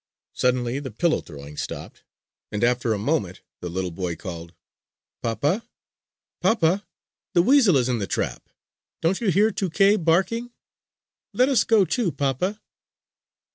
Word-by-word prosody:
Suddenly 125 0 0
the 140 -2 -6
pillow 160 +9 +1
throwing 75 -1 -11
stopped; - - -6 0.5
and 105 +2 -2
after 120 -1 +2
a 110 - +1
moment 105 - -1 0.2
the 90 - -5
little 90 +1 -3
boy 85 0 -3
called: 85 -2 -8 0.7
"Papa! 145 - 0 0.8
Papa! 195 -2 +2 0.5
The 175 - +6
weasel 240 - +5
is 125 -2 +1
in 125 -2 0
the 100 - -3
trap. - - -3 0.5
Don't 180 +6 +1
you 220 - +1
hear 205 +5 +4
Tuké 195 +1 +2
barking? 195 +9 +1 0.8
Let 255 +2 +3
us 270 - +4
go 220 -4 +4
too, 220 -3 0
papa!" 145 - -1
145 Hz, 135 wpm, -24 LUFS, -, 0.8 s, The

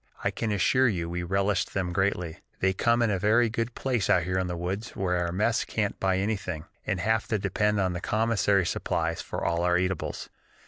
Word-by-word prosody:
I - - +1
can 115 -2 -2
assure 115 +7 +3
you 90 -7 -1
we 90 +1 -3
relished 95 +3 0
them 90 -3 -1
greatly; 90 -3 -1 0.2
they 95 0 +2
come 115 +4 +2
in 105 -4 +2
very 110 +3 +3
good 115 +1 -2
place 125 -7 -1
out 90 - +4
here 90 +2 0
in 90 - -1
the 90 -1 -3
woods 95 +6 -4
where 90 -2 0
our 85 - -2
mess 110 +6 +1
can't 105 -2 -2
buy 95 -1 +1
anything, 95 -5 -2 0.2
and 100 -3 0
have 110 +4 +1
to 110 - +1
depend 105 +1 0
on 95 -2 +1
the 90 - -4
commissary 100 -4 +2
supplies 85 -1 -1
for - - -4
all 85 0 +1
our 90 0 +3
eatables. 95 +1 -2
95 Hz, 210 wpm, -27 LUFS, 90-110 Hz, 0.2 s, out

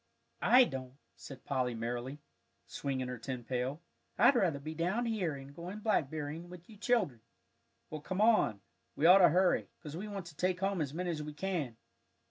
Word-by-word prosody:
"I 255 +1 +7
don't," 130 - -5 0.2
said 135 -2 -11
Polly, 130 -3 -1
merrily, 120 +5 -4 0.4
swinging 130 -2 -3
her 125 -1 -5
tin 125 0 -5
pail. 130 +6 -3 0.3
"I'd 240 +6 +6
rather 180 -11 +2
be 155 +3 -6
down 180 +9 0
here 195 -10 -1
and 135 0 -10
going 180 +6 -7
blackberrying 155 -5 -1
with 175 -1 -12
you 220 - -14
children. 195 - +1 0.7
Well, 155 -1 -5
come 185 +5 -4
on, 215 - +4 0.3
we 155 - 0
ought 185 +3 +9
to 175 -3 +8
hurry, 180 +3 +2
'cause 150 -1 -7
we 195 +5 -5
want 200 -3 -5
to 165 -3 -11
take 185 +3 0
home 195 -2 0
as 140 -3 -2
many 175 +3 -2
as 155 -2 -3
we 150 0 -6
can." 150 -8 -3
160 Hz, 185 wpm, -33 LUFS, 135-190 Hz, 0.7 s, ought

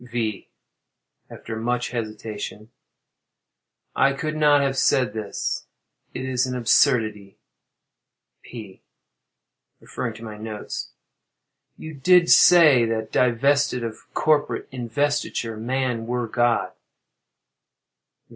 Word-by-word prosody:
V. 115 -4 -4 0.8
[After 115 - -8
much 120 +2 -2
hesitation.] 110 -1 -6 1.2
I 140 0 +3
could 155 +2 -4
not 150 -2 +4
have 135 -1 0
said 125 -4 +2
this; 110 -2 -4 0.5
it 130 - -4
is 130 0 0
an 125 - -4
absurdity. 110 -5 +1 1.0
P. 105 -6 -11 1.0
[Referring 115 - -6
to 115 - -12
my 105 -2 -9
notes.] 110 -1 -6 0.9
You 155 - -9
did 175 +5 +4
say 155 -8 +7
that 115 -1 -3
"divested 125 +1 +1
of 115 -1 -8
corporate 150 -1 +1
investiture 125 -2 -2
man 120 0 -2
were 120 -1 -2
God." 120 0 0
120 Hz, 100 wpm, -23 LUFS, 110-135 Hz, 1.2 s, say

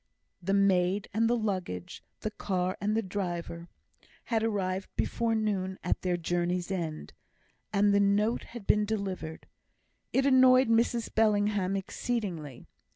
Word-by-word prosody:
The 195 +3 0
maid 195 0 +2
and 225 +2 +2
the 240 - +2
luggage, 185 - -4 0.2
the 215 - -3
car 185 -3 -2
and 210 +2 +1
the 225 - +1
driver, 175 -3 -4 0.6
had 225 -2 0
arrived 195 -4 -1
before 230 -1 0
noon 195 -4 -1
at 180 - 0
their 180 -1 0
journey's 175 +2 -1
end, 165 -5 -4 0.6
and 205 0 +3
the 200 - +4
note 205 +3 +2
had 235 -4 -10
been 210 - +3
delivered. 195 -7 -4 0.7
It 270 - +2
annoyed 260 -2 +6
Mrs 230 0 +1
Bellingham 205 -3 +2
exceedingly. 190 - -4
200 Hz, 135 wpm, -29 LUFS, 180-220 Hz, 0.7 s, annoyed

